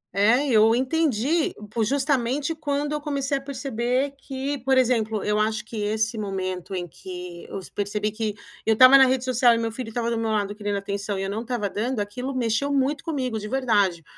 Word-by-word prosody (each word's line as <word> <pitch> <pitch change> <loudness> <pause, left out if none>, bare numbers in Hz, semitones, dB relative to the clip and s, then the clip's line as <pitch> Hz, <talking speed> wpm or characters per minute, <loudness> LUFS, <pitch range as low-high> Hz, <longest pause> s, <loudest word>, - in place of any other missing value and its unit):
É, 230 +8 +4
eu 225 -2 +5
entendi 285 +2 +1 0.3
justamente 275 +3 0
quando 290 -1 -2
eu 300 - -2
comecei 280 -1 -1
a - - -14
perceber 260 -1 -1
que, 275 +1 -4
por 265 +2 +2
exemplo, 225 -4 +1
eu 210 0 +1
acho 220 +1 0
que 220 0 -8
esse 220 +2 -1
momento 190 -2 -4
em 175 -1 -3
que 180 +2 -9
eu 195 - -5
percebi 205 +1 -1
que 215 -1 -3 0.3
eu 220 - +3
estava 255 +4 +9
na 265 -1 +8
rede 255 -1 +1
social 250 -2 +4
e - - 0
meu 230 0 -1
filho 230 0 -6
estava 235 +1 -2
do 230 - 0
meu 225 -1 -1
lado 205 -2 0
querendo 205 -1 -3
atenção 200 0 -3
e 195 - -2
eu 195 - -2
não 220 +2 -3
estava 235 -4 -2
dando, 230 +4 -2
aquilo 250 +6 -4
mexeu 245 +3 0
muito 280 +2 +1
comigo, 260 -9 -2
de 210 - -6
verdade. 205 -9 +1
230 Hz, 200 wpm, -24 LUFS, 210-265 Hz, 0.3 s, estava